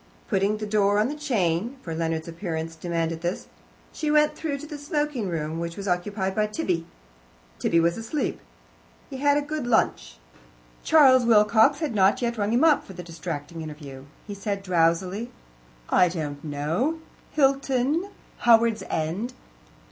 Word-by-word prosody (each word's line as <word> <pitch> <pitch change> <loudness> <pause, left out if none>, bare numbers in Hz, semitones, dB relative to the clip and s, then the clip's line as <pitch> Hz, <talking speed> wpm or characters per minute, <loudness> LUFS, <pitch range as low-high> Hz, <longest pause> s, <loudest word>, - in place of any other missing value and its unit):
Putting 200 +2 +1
the 215 - -4
door 205 -1 +2
on 215 +4 +2
the 295 - -4
chain 230 - -1
for 165 - -5
Leonard's 160 0 -2
appearance 165 -2 -4
demanded 165 -1 -2
this 175 +2 -3 0.5
she 310 - -2
went 300 0 +3
through 300 -3 -3
to 290 - -9
the 300 -1 -8
smoking 290 -7 -2
room, 160 -1 -3
which 170 0 -5
was 200 0 -5
occupied 190 +2 -1
by 215 +1 +1
Tibby. 185 - -2 0.7
Tibby 170 - +2
was 170 +4 +1
asleep. 250 +5 -2 0.7
He 265 - -5
had 285 +1 +3
had 290 - +1
a - - -11
good 300 -4 -3
lunch. - - +1 0.7
Charles 265 -5 +6
Wilcox 220 +3 +4
had 305 -6 -1
not 200 +3 +3
yet 235 -2 -2
rung 205 +1 0
him 240 +5 +3
up 315 -3 +5
for 195 - -11
the 180 0 -8
distracting 165 -1 -6
interview. 145 -4 -9 0.2
He 205 - -6
said 200 0 -4
drowsily: 185 +5 +1 0.6
"I 180 - +4
don't 150 -4 -5
know. 160 - -1 0.4
Hilton. 275 +4 +1 0.3
Howards 230 -2 +4
End. 180 +11 -2
205 Hz, 160 wpm, -25 LUFS, 165-260 Hz, 0.7 s, Charles